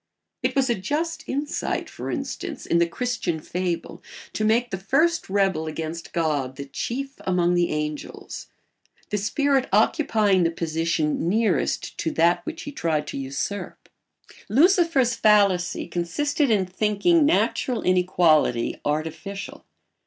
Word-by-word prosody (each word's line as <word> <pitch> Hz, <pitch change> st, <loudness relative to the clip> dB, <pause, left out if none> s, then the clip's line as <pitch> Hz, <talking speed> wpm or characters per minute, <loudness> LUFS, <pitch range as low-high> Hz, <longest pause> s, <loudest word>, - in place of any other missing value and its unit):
It -, -, -1 dB
was 270 Hz, -1 st, +3 dB
a 240 Hz, -, +2 dB
just 305 Hz, -, -3 dB
insight, 290 Hz, +3 st, -2 dB
for -, -, -7 dB
instance, -, -, -4 dB
in 170 Hz, -, +2 dB
the 170 Hz, -, +3 dB
Christian 190 Hz, -4 st, -2 dB
fable 175 Hz, +1 st, -4 dB, 0.3 s
to 215 Hz, -, -2 dB
make 230 Hz, +2 st, +2 dB
the 190 Hz, -, -3 dB
first 310 Hz, -, +1 dB
rebel 190 Hz, -5 st, +1 dB
against 160 Hz, +1 st, -5 dB
God 145 Hz, -6 st, -1 dB
the 140 Hz, -, -6 dB
chief 270 Hz, -, -4 dB
among 180 Hz, -1 st, +1 dB
the 175 Hz, -1 st, +2 dB
angels, 150 Hz, -1 st, -5 dB, 0.6 s
the 210 Hz, -, 0 dB
spirit 275 Hz, +5 st, +1 dB
occupying 210 Hz, -, +3 dB
the 165 Hz, -, +3 dB
position 165 Hz, -1 st, -1 dB
nearest 215 Hz, 0 st, 0 dB
to 160 Hz, -, 0 dB
that 170 Hz, +2 st, +3 dB
which 325 Hz, +1 st, -5 dB
he 290 Hz, -, -6 dB
tried 160 Hz, -, -1 dB
to -, -, -5 dB
usurp. 135 Hz, +9 st, -5 dB, 0.6 s
Lucifer's 305 Hz, -, +4 dB
fallacy 200 Hz, -5 st, +3 dB
consisted 280 Hz, -, 0 dB
in 205 Hz, -4 st, +3 dB
thinking 210 Hz, -, +2 dB
natural 265 Hz, -5 st, +1 dB
inequality 175 Hz, -9 st, +2 dB
artificial. 160 Hz, +6 st, -4 dB
190 Hz, 130 wpm, -24 LUFS, 165-250 Hz, 0.6 s, Lucifer's